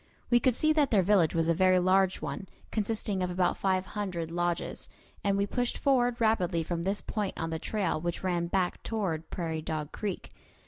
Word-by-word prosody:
We 240 Hz, -, +6 dB
could 250 Hz, 0 st, +2 dB
see 310 Hz, +3 st, +3 dB
that 295 Hz, -3 st, +3 dB
their 200 Hz, -4 st, +4 dB
village 180 Hz, -4 st, +3 dB
was 165 Hz, -1 st, +2 dB
a 170 Hz, -, +4 dB
very 185 Hz, +2 st, +4 dB
large 185 Hz, +1 st, +3 dB
one, 195 Hz, -, -4 dB, 0.2 s
consisting 210 Hz, -2 st, -1 dB
of 180 Hz, -, 0 dB
about 180 Hz, 0 st, +1 dB
five 190 Hz, -1 st, 0 dB
hundred 180 Hz, -6 st, -4 dB
lodges; 175 Hz, 0 st, -2 dB, 0.3 s
and 200 Hz, -1 st, +2 dB
we 200 Hz, -, +2 dB
pushed 245 Hz, +4 st, -1 dB
forward 245 Hz, -3 st, +2 dB
rapidly 185 Hz, -7 st, +2 dB
from 170 Hz, +1 st, -3 dB
this 195 Hz, +2 st, 0 dB
point 210 Hz, -3 st, -3 dB
on 165 Hz, 0 st, -3 dB
the 160 Hz, -, -2 dB
trail 190 Hz, -6 st, -1 dB
which 175 Hz, +1 st, -3 dB
ran 175 Hz, -2 st, 0 dB
back 180 Hz, 0 st, 0 dB
toward 180 Hz, -8 st, -2 dB
Prairie 160 Hz, -3 st, -3 dB
Dog 155 Hz, -1 st, -4 dB
Creek. 205 Hz, -4 st, -4 dB
185 Hz, 195 wpm, -29 LUFS, 170-210 Hz, 0.3 s, We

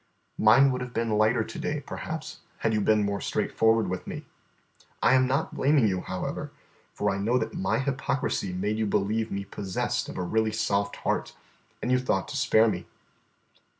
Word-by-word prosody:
Mine 130 Hz, +6 st, +6 dB
would 125 Hz, 0 st, -2 dB
have 125 Hz, 0 st, -6 dB
been 115 Hz, -1 st, 0 dB
lighter 110 Hz, 0 st, +3 dB
to -, -, -8 dB
day, -, -, -2 dB
perhaps, -, -, -6 dB, 0.2 s
had 115 Hz, -, 0 dB
you 105 Hz, -, +1 dB
been 105 Hz, 0 st, +3 dB
more 100 Hz, 0 st, -2 dB
straightforward 115 Hz, 0 st, +2 dB
with 95 Hz, -, -4 dB
me. -, -, -6 dB, 0.7 s
I -, -, +4 dB
am 130 Hz, 0 st, +4 dB
not 135 Hz, +4 st, 0 dB
blaming 140 Hz, -4 st, +3 dB
you, 95 Hz, -2 st, 0 dB
however, -, -, -4 dB, 0.4 s
for -, -, 0 dB
I 100 Hz, -, -2 dB
know 115 Hz, +5 st, +2 dB
that 110 Hz, -2 st, -2 dB
my 95 Hz, -, 0 dB
hypocrisy 135 Hz, -7 st, -1 dB
made 105 Hz, +4 st, -2 dB
you 110 Hz, -, +1 dB
believe 110 Hz, +3 st, 0 dB
me 100 Hz, 0 st, -3 dB
possessed 95 Hz, -2 st, -2 dB
of -, -, -7 dB
a 90 Hz, -, -1 dB
really 110 Hz, +4 st, +1 dB
soft 100 Hz, -2 st, 0 dB
heart, -, -, -1 dB, 0.5 s
and 125 Hz, -, 0 dB
you 125 Hz, -, +4 dB
thought 100 Hz, -6 st, 0 dB
to -, -, -5 dB
spare 115 Hz, -4 st, +4 dB
me. 90 Hz, -5 st, -2 dB
110 Hz, 185 wpm, -27 LUFS, 100-125 Hz, 0.7 s, Mine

